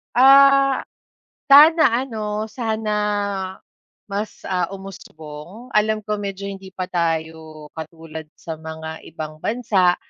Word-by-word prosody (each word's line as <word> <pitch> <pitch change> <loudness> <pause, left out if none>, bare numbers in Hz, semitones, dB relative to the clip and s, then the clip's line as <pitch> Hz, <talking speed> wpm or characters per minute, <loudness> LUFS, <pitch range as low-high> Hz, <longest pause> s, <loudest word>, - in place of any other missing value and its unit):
Ah, 275 +1 +6 0.7
sana 310 +4 +8 0.2
ano 215 -3 -3
sana 220 -2 -3 1.2
mas 205 +2 -4
ah, 180 -2 0
umusbong. 190 +1 -10
Alam 215 0 +2
ko 210 0 -2
medyo 200 -1 -5
hindi 195 -1 -9
pa 185 0 -4
tayo 160 -3 -3
katulad 160 0 -8
sa 160 -1 -7
mga 160 0 -8
ibang 155 -1 -8
bansa 205 -6 +2
195 Hz, 105 wpm, -21 LUFS, 160-220 Hz, 1.2 s, sana